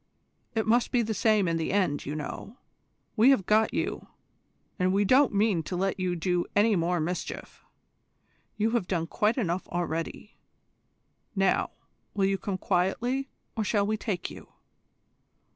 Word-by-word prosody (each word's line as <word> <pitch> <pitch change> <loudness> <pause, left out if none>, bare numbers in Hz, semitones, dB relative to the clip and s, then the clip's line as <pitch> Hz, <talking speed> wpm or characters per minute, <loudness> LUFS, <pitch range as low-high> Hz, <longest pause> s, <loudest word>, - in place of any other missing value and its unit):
It 220 - +1
must 235 +2 +2
be 245 -2 +2
the 220 0 -2
same 210 -2 +2
in 165 0 +1
the 160 - -2
end, 185 -9 0
you 145 - -3
know. 155 - -6 0.6
We 235 +3 +6
have 260 -9 +4
got 215 +2 +3
you, - - -3 0.7
and 185 0 +2
we 200 +2 +2
don't 260 +5 +5
mean 205 -4 +2
to 180 - -5
let 190 +2 -1
you 180 -1 0
do 175 +1 0
any 210 +1 +4
more 175 0 +1
mischief. 175 +3 -5 0.9
You 220 +1 +1
have 230 -6 0
done 170 -3 -1
quite 210 +7 0
enough 185 -6 -1
already. 170 +3 -4 1.0
Now, 195 -1 +2 0.5
will 195 -1 +2
you 195 0 +1
come 200 -4 -3
quietly, 230 +10 0 0.3
or 220 - 0
shall 205 -1 +1
we 215 +1 0
take 205 -4 -3
you? - - -12
195 Hz, 160 wpm, -28 LUFS, 175-220 Hz, 1.0 s, We